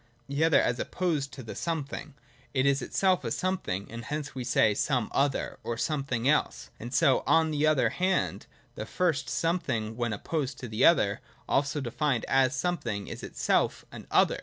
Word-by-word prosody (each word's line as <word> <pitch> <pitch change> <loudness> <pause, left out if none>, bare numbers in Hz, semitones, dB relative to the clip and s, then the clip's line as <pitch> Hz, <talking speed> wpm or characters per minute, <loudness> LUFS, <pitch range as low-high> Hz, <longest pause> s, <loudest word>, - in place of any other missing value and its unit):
The 140 +3 0
other, 160 -1 +5
as 120 0 0
opposed 155 -7 -1
to 130 - -8
the 110 - -7
something, 160 -5 -4 0.4
is 140 +1 +3
itself 185 -2 +1
a - - -2
something, 180 - -2
and 115 0 -7
hence 150 0 -4
we 130 - -4
say 115 -3 +3
some 125 0 0
other, 140 -1 0
or 115 - -3
something 135 -3 -1
else; 150 +2 +1
and 120 +2 -7
so 130 +1 +4
on 160 -1 +4
the 150 0 +2
other 155 -3 +3
hand 185 +1 0 0.3
the - - -6
first 170 -5 0
something 165 -11 -1
when 120 -1 -1
opposed 135 +6 -3
to 125 - -7
the 110 0 -1
other, 105 -12 +4 0.3
also 140 +2 +1
defined 125 +1 -1
as 135 0 +3
something, 125 - -2
is - - -7
itself - - 0
an - - -10
other. - - +3
140 Hz, 175 wpm, -28 LUFS, 120-160 Hz, 0.4 s, other